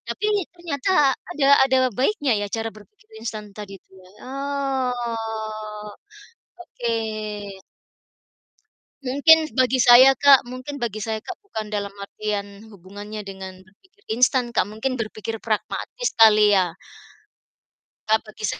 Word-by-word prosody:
tapi 375 Hz, -, -2 dB, 0.3 s
ternyata 340 Hz, -2 st, -3 dB, 0.4 s
ada 275 Hz, -2 st, +1 dB, 0.2 s
ada 260 Hz, -1 st, +2 dB, 0.2 s
baiknya 280 Hz, -, +1 dB
ya 205 Hz, -, -2 dB
cara 225 Hz, +1 st, -2 dB
berpikir 415 Hz, -, -19 dB
instan 210 Hz, -3 st, -6 dB
tadi 200 Hz, -2 st, -9 dB
itu -, -, -47 dB
ya? 185 Hz, -, -18 dB, 0.2 s
Oh, 235 Hz, -6 st, -4 dB, 0.8 s
oke. 240 Hz, -8 st, -5 dB, 2.1 s
Mungkin 310 Hz, +4 st, +4 dB
bagi 255 Hz, 0 st, +2 dB
saya, 245 Hz, +3 st, +8 dB
Kak 275 Hz, -1 st, +5 dB
mungkin 255 Hz, +4 st, -8 dB
bagi 235 Hz, -5 st, -4 dB
saya, 220 Hz, 0 st, -4 dB
Kak, 375 Hz, -, -8 dB
bukan 220 Hz, -, -7 dB
dalam 200 Hz, -1 st, -3 dB
artian 205 Hz, +1 st, -5 dB
hubungannya 205 Hz, +2 st, -9 dB
dengan 190 Hz, -1 st, -9 dB
berpikir 380 Hz, -, -29 dB
instan, 245 Hz, +1 st, +2 dB
Kak. 215 Hz, -, +1 dB
Mungkin 235 Hz, +4 st, -4 dB
berpikir 220 Hz, 0 st, -5 dB
pragmatis 230 Hz, -, -3 dB
kali, 215 Hz, -2 st, +7 dB
ya? 180 Hz, -4 st, +2 dB, 1.3 s
Nah, 220 Hz, 0 st, +4 dB
bagi 215 Hz, 0 st, -13 dB
sa -, -, -3 dB
225 Hz, 125 wpm, -22 LUFS, 210-270 Hz, 2.1 s, saya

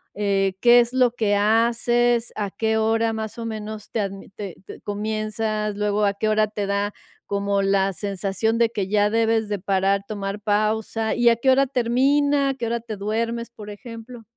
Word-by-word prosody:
Eh, 195 Hz, -2 st, 0 dB
¿qué 245 Hz, 0 st, +7 dB
es 240 Hz, 0 st, +2 dB
lo 255 Hz, -2 st, +3 dB
que 215 Hz, -4 st, 0 dB
haces?¿A 230 Hz, 0 st, +2 dB
qué 220 Hz, +2 st, -1 dB
hora, 225 Hz, +1 st, +1 dB
más 220 Hz, +1 st, -5 dB
o 230 Hz, -, -5 dB
menos, 215 Hz, -1 st, -6 dB
te 225 Hz, -, -2 dB
adm 195 Hz, -1 st, -4 dB
te 195 Hz, -4 st, -6 dB
te -, -, -11 dB
comienzas? 215 Hz, 0 st, -2 dB
Luego, 210 Hz, 0 st, 0 dB
¿a 200 Hz, 0 st, +1 dB
qué 215 Hz, -, -1 dB
hora 215 Hz, 0 st, +3 dB
te 205 Hz, -1 st, -4 dB
da 200 Hz, +1 st, -1 dB, 0.3 s
como 200 Hz, 0 st, 0 dB
la 195 Hz, 0 st, +2 dB
sensación 200 Hz, +4 st, -1 dB
de 235 Hz, -1 st, +3 dB
que 200 Hz, -4 st, -2 dB
ya 210 Hz, +1 st, +2 dB
debes 225 Hz, -1 st, +1 dB
de 205 Hz, -2 st, -2 dB
parar, 195 Hz, +1 st, +1 dB
tomar 200 Hz, -1 st, -4 dB
pausa, 215 Hz, +1 st, 0 dB
y 240 Hz, 0 st, +4 dB
a 230 Hz, -, +4 dB
qué 260 Hz, +3 st, +2 dB
hora 270 Hz, +1 st, +4 dB
termina? 275 Hz, +3 st, +2 dB
¿A -, -, 0 dB
qué 240 Hz, -, -4 dB
hora 235 Hz, +1 st, -1 dB
te 225 Hz, -3 st, -7 dB
duermes?, 230 Hz, +3 st, -2 dB
por 210 Hz, -2 st, -10 dB
ejemplo. 230 Hz, +2 st, -10 dB
215 Hz, 190 wpm, -23 LUFS, 205-230 Hz, 0.3 s, qué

